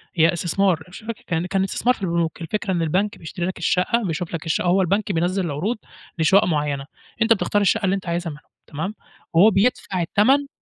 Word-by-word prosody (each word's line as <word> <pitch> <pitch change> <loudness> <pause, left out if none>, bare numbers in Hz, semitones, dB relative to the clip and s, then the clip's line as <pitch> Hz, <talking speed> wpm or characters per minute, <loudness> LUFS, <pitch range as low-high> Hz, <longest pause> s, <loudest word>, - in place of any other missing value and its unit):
هي 165 +2 +4
استثمار 175 0 +1
مش 185 - -10
فاكر 230 0 -7
كان 170 0 -1
كان 190 +1 0
استثمار 245 +5 +1
في - - -18
البنوك، 170 -2 -1
الفكرة 200 +3 -2
إن 175 -2 0
البنك 185 +6 0
بيشتري 170 +1 -5
لك 185 - -3
الشَّقّة، 185 +7 +1
بيشوف 165 +1 -3
لك 165 0 -4
الشَّقَّة، 160 +2 0
هو 190 +2 +4
البنك 200 +3 0
بينزّل 180 +2 0
العروض 170 +11 -2 0.4
لشُقق 190 +6 +5
مُعيّنة، 145 -4 -1 0.4
أنت 225 0 +6
بتختار 205 0 0
الشّقّة 200 +1 +2
اللي 190 +1 +2
أنت 190 - -6
عايزها 170 0 -2
منهم 150 - -11 0.3
تمام، 175 +8 -4 0.4
وهو 190 +7 +7
بيدفع 195 -3 +1
التمن 260 +11 +3
180 Hz, 200 wpm, -22 LUFS, 165-205 Hz, 0.4 s, وهو